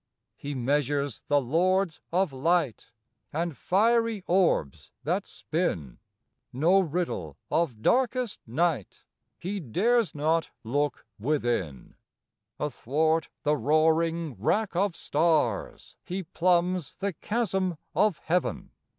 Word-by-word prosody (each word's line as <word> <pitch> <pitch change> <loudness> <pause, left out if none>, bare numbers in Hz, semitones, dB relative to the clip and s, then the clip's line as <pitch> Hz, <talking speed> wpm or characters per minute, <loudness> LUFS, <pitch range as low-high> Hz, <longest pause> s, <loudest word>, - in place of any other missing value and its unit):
He 145 0 -6
measures 140 +1 0
the 145 0 +4
lords 175 +6 +1
of 180 -3 +1
light 150 -3 0 0.4
And 165 0 -2
fiery 225 - +2
orbs 175 - +1
that - - -1
spin; 70 -7 -3 0.5
No 165 +9 +4
riddle 175 -1 -2
of 130 -10 0
darkest 250 -2 +1
night 145 - -1 0.3
He 200 +3 -4
dares 205 - +1
not 160 +3 +1
look 145 +4 -1
within; 120 - -1 0.7
Athwart 155 +3 0
the 150 0 +3
roaring 160 +3 +2
wrack 205 - +1
of 190 -1 +1
stars 150 -8 0
He 185 +2 -4
plumbs 180 0 +1
the 200 -1 -2
chasm 190 -3 -1 0.2
of 210 -6 +3
heaven. 180 +2 -1
165 Hz, 105 wpm, -27 LUFS, 145-185 Hz, 0.7 s, the